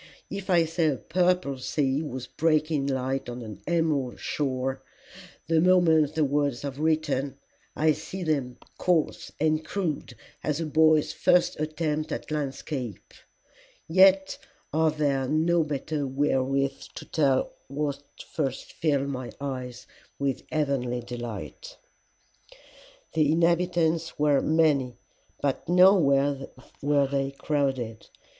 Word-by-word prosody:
If 195 0 -6
I 170 -3 +4
say 165 0 0
a 145 - +2
purple 180 -5 0
sea 135 +1 0
was 130 -5 -5
breaking 155 -1 +1
in 135 - +1
light 130 0 -2
on 120 0 -6
an 105 -3 -9
emerald 155 -7 0
shore, 135 -2 -2 0.6
the 160 -1 +2
moment 160 -4 +4
the 160 - +2
words 145 -2 0
are 140 - -2
written, 145 -2 -1 0.4
I 155 +1 +3
see 185 +4 -5
them 140 -6 -1 0.2
coarse 175 -4 0
and 155 0 +1
crude 165 -2 -3 0.3
as 150 0 -1
a 165 - -1
boy's 155 0 +3
first 175 -3 +2
attempt 155 0 -2
at - - -5
landscape; 135 -5 -4 0.7
yet 190 +2 +4 0.3
are 160 +1 +3
there 140 -3 0
no 160 +3 +2
better 150 0 -3
wherewith 135 0 0
to - - -8
tell 135 -4 +1
what 140 0 -3 0.3
first 135 -4 -3
filled 140 -4 0
my 130 -3 -4
eyes 130 -3 -5 0.3
with 140 -2 -1
heavenly 135 -5 -1
delight. 120 - -7 1.4
"'The 155 -2 +3
inhabitants 170 -1 +1
were 145 -2 +3
many, 150 -6 +2 0.5
but 140 +2 -1
nowhere 145 -7 +4 0.3
were 145 0 +3
they 135 0 -1
crowded. 135 -5 -2
150 Hz, 125 wpm, -27 LUFS, 135-160 Hz, 1.4 s, I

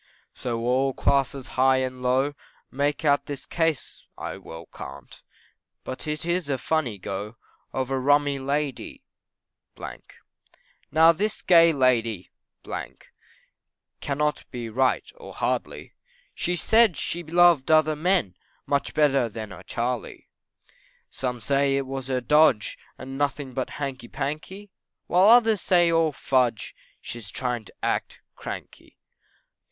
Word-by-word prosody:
So 115 -2 -3
all 130 +3 +1
classes 135 -1 0
high 130 0 +3
and 130 -1 -3
low, 130 +3 +1 0.4
Make 145 +3 -1
out 145 -1 +3
this 145 -2 -6
case 165 -4 -2
I - - -5
well 80 +1 -10
can't, 65 - -10 0.6
But 130 +4 -6
it 150 +2 -3
is 175 -3 -1
a 135 - +1
funny 130 -6 -1
go, 100 +4 -5 0.4
Of 130 0 -3
rummy 140 +1 +2
Lady. 140 0 -3 1.9
Now 160 +1 +7
this 205 +6 -2
gay 170 -2 +7
Lady 115 - +1 1.7
Cannot 150 +1 -1
be 120 -3 -6
right, 130 +3 +1
or 480 - -11
hardly, - - -3 0.4
She 175 - -1
said 220 - +4
she 175 +5 -3
loved 170 -3 +4
other 155 -1 +4
men, 160 - +1 0.3
Much 140 -1 -1
better 135 -5 +3
than 110 -1 -7
her 95 - -10
Charley. 120 0 -4 0.8
Some 125 -2 -3
say 140 +3 +1
it 135 - -1
was 135 -1 -5
her 130 -1 -1
dodge, 150 -4 +3 0.2
And 135 +2 -8
nothing 140 -2 -2
but 130 +1 -2
hanky 135 -4 -5
panky, 155 +10 -5 0.3
While 185 +4 +5
others 225 -3 +6
say 175 -2 +4
all 165 -1 +3
fudge, 125 -6 0 0.3
She 120 - -7
is 105 -4 -9
trying 125 -1 -3
to - - -14
act - - -2
cranky. - - -9
135 Hz, 130 wpm, -25 LUFS, 125-155 Hz, 1.9 s, Now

